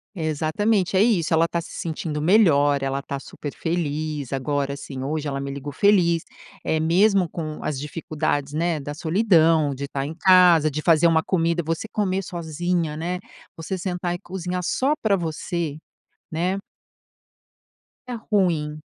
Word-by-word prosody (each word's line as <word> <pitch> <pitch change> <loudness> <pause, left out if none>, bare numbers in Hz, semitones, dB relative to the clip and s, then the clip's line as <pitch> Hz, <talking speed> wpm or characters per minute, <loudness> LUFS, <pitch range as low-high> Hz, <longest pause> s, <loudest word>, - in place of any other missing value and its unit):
Exatamente, 180 +5 0
é 190 - +5
isso, 190 -9 +2
ela 165 +1 +4
tá 170 0 -2
se - - -11
sentindo 155 -2 -4
melhor, 145 -7 +4
ela 135 0 -1
tá 140 0 -5
super 145 +1 -8
feliz. 155 -4 -3
Agora, 140 +1 -1
assim, 135 -2 -7
hoje 150 +2 -2
ela 140 -1 -2
me 140 0 -4
ligou 140 +1 -6
feliz, 170 -1 +3 0.4
eh, 160 0 +1
mesmo 185 +2 +3
com 155 -2 -6
as 140 -3 -2
dificuldades, 150 -1 -2
né, 165 +1 0
da 145 +1 -5
solidão, 160 -4 +3
de 140 +1 -5
tá 135 -1 -3
em 155 - -5
casa, 175 -3 +6
de 150 +2 -4
fazer 165 0 +4
uma 160 -1 +3
comida, 170 -2 0
você 165 +7 -2
comer 195 -2 -1
sozinha, 170 -1 -2
né, 175 +3 -3 0.4
você 175 +4 -4
sentar 180 -1 -2
e 175 - -5
cozinhar 180 0 -4
só 275 +9 +1
pra 210 -3 +3
você. 165 -2 -3 0.5
Né. 175 +4 0 1.5
É 250 - -4
ruim. 170 -9 0
165 Hz, 155 wpm, -23 LUFS, 150-180 Hz, 1.5 s, casa